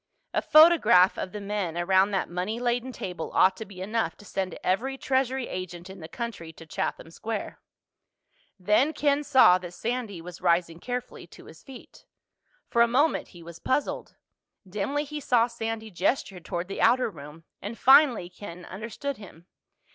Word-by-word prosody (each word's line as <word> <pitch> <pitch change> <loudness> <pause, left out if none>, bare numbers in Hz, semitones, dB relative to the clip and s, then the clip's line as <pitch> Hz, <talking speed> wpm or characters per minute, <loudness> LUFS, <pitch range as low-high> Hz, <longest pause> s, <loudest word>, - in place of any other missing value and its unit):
A - - +1
photograph 305 - +6
of 185 - -5
the 210 - -6
men 200 -4 -3
around 190 +3 +3
that 195 -2 -1
money 185 +6 -3
laden 245 +1 -1
table 180 -8 -6
ought 190 0 +5
to 220 - -6
be 185 -2 -11
enough 225 +3 -2
to 205 - -15
send 190 -3 -3
every 255 +9 0
Treasury 265 -1 0
agent 180 0 -7
in 190 - -11
the 160 - -8
country 220 -7 -6
to 165 - -13
Chatham 160 +1 -4
Square. 220 +4 -5 1.0
Then 210 - +2
Ken 290 -1 +1
saw 260 -11 +6
that 175 -1 -9
Sandy 230 -5 -3
was 175 +2 -10
rising 170 -1 +1
carefully 250 +4 -6
to - - -15
his - - -14
feet. 265 -3 -14 0.6
For 235 - +2
a 235 - +6
moment 280 +7 +1
he 175 -1 -14
was 170 0 -11
puzzled. 280 +3 -2 0.5
Dimly 210 +10 -2
he 300 0 -6
saw 245 -5 +3
Sandy 225 -2 -5
gesture 190 +1 -1
toward 175 0 -5
the 195 - -5
outer 250 -2 +3
room, 150 0 -12 0.2
and 215 +4 -6
finally 265 - +5
Ken 180 -1 -10
understood 230 +8 -6
him. 175 -5 -14
205 Hz, 170 wpm, -27 LUFS, 180-250 Hz, 1.0 s, photograph